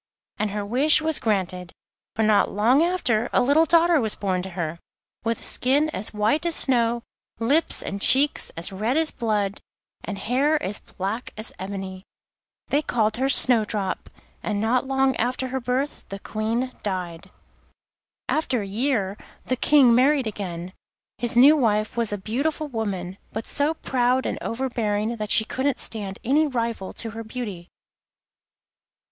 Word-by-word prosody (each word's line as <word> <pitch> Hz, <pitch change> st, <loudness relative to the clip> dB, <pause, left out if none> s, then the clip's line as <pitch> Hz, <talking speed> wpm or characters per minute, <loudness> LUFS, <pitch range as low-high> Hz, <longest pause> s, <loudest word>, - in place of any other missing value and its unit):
And 215 Hz, -, 0 dB
her 205 Hz, 0 st, -4 dB
wish 270 Hz, +9 st, +4 dB
was 315 Hz, -1 st, 0 dB
granted, 185 Hz, -5 st, -2 dB, 0.4 s
for 220 Hz, -, +1 dB
not 215 Hz, -1 st, +3 dB
long 235 Hz, +8 st, +3 dB
after 255 Hz, -10 st, +1 dB
a -, -, +3 dB
little 290 Hz, +5 st, +4 dB
daughter 335 Hz, -1 st, +4 dB
was 220 Hz, -2 st, +1 dB
born 185 Hz, -3 st, -1 dB
to 190 Hz, -, -6 dB
her, 170 Hz, -1 st, -3 dB, 0.4 s
with 230 Hz, 0 st, -1 dB
a -, -, -8 dB
skin 290 Hz, +5 st, +3 dB
as 205 Hz, -4 st, -2 dB
white 215 Hz, +9 st, +1 dB
as 335 Hz, -, +2 dB
snow, 235 Hz, -3 st, +3 dB, 0.3 s
lips 280 Hz, +8 st, +1 dB
and 200 Hz, +1 st, -5 dB
cheeks 275 Hz, +5 st, +4 dB
as 170 Hz, +3 st, -1 dB
red 215 Hz, +8 st, -1 dB
as 320 Hz, -1 st, +2 dB
blood, 205 Hz, -3 st, -2 dB, 0.4 s
and 205 Hz, -, -5 dB
hair 265 Hz, +9 st, +1 dB
as 200 Hz, +2 st, -2 dB
black 200 Hz, +6 st, -5 dB
as 215 Hz, +1 st, -4 dB
ebony. 190 Hz, -1 st, -6 dB, 0.7 s
They 290 Hz, -, +2 dB
called 220 Hz, -6 st, 0 dB
her 265 Hz, +2 st, 0 dB
Snowdrop, 215 Hz, -7 st, +2 dB, 0.3 s
and 210 Hz, -1 st, -2 dB
not 245 Hz, +5 st, +1 dB
long 270 Hz, 0 st, +2 dB
after 255 Hz, +2 st, -1 dB
her 265 Hz, +1 st, -2 dB
birth 255 Hz, +4 st, -3 dB
the 195 Hz, -, -5 dB
Queen 225 Hz, +5 st, -2 dB
died. 180 Hz, -4 st, -4 dB, 1.0 s
After 255 Hz, -8 st, 0 dB
a -, -, -6 dB
year 210 Hz, -2 st, -1 dB, 0.3 s
the 255 Hz, -, 0 dB
King 260 Hz, -1 st, +5 dB
married 265 Hz, +2 st, +3 dB
again. 185 Hz, -4 st, -5 dB, 0.5 s
His 240 Hz, -1 st, 0 dB
new 280 Hz, +5 st, +8 dB
wife 215 Hz, -6 st, +1 dB
was 235 Hz, -3 st, 0 dB
a 205 Hz, -, -1 dB
beautiful 280 Hz, +10 st, -2 dB
woman, 200 Hz, -7 st, -4 dB
but 220 Hz, +1 st, -5 dB
so 295 Hz, +3 st, 0 dB
proud 255 Hz, -2 st, 0 dB
and -, -, -2 dB
overbearing 230 Hz, -3 st, -2 dB
that 215 Hz, -1 st, -4 dB
she 220 Hz, -, +4 dB
couldn't 265 Hz, +2 st, -1 dB
stand 200 Hz, -4 st, -2 dB
any 300 Hz, +5 st, +3 dB
rival 230 Hz, -7 st, -3 dB
to 225 Hz, -, -5 dB
her 225 Hz, +1 st, -7 dB
beauty. 215 Hz, -7 st, -6 dB
230 Hz, 160 wpm, -24 LUFS, 205-265 Hz, 1.0 s, new